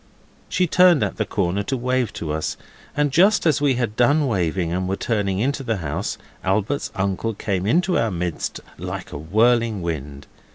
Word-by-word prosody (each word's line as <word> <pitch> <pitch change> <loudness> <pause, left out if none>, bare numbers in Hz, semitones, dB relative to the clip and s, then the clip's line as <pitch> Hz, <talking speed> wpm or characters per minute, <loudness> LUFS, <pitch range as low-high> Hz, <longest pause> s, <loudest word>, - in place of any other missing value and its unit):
She 185 - +2
turned 180 -2 +5
at - - -2
the 110 - -1
corner 95 0 0
to 130 +6 -2
wave 125 -1 0
to 75 - -4
us, 80 0 -2 0.4
and 145 -1 +2
just 195 +8 +4
as 155 -3 +3
we 140 -3 +3
had 120 -3 -2
done 145 +6 +3
waving, 90 - 0
and 90 +1 -1
were 95 - 0
turning 100 -3 -1
into 135 +7 0
the 115 -5 -1
house, 80 +3 -3 0.3
Albert's 105 +9 0
uncle 100 +3 -1
came 95 -2 -2
into 175 - +2
our 115 - +1
midst 90 -3 -3 0.2
like - - -6
a - - -5
whirling 110 +4 +2
wind. 70 -4 -5
110 Hz, 180 wpm, -22 LUFS, 90-130 Hz, 0.4 s, turned